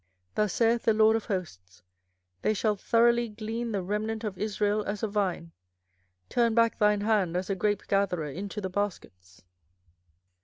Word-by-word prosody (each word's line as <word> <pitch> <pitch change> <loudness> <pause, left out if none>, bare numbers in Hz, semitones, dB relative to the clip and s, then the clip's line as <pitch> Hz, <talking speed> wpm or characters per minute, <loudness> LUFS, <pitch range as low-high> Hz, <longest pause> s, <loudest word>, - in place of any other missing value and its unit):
24:006:009 - - -44
Thus 210 -3 +1
saith 230 0 +2
the 225 - +3
LORD 220 0 +5
of 225 - -2
hosts, 90 - -6 0.6
They 215 - +2
shall 210 +1 +1
throughly 235 +3 +3
glean 225 +2 -4
the 200 -3 -2
remnant 215 +3 -2
of 210 -3 -3
Israel 210 +1 0
as 205 +2 -4
a - - +2
vine: 190 -5 -2 0.8
turn 235 -2 +1
back 230 -1 +3
thine 210 -1 +3
hand 205 -5 +1
as 185 +2 -3
a - - 0
grapegatherer 195 -5 0
into 200 +3 -5
the 190 - -3
baskets. 95 - -5
210 Hz, 160 wpm, -28 LUFS, 185-220 Hz, 0.8 s, LORD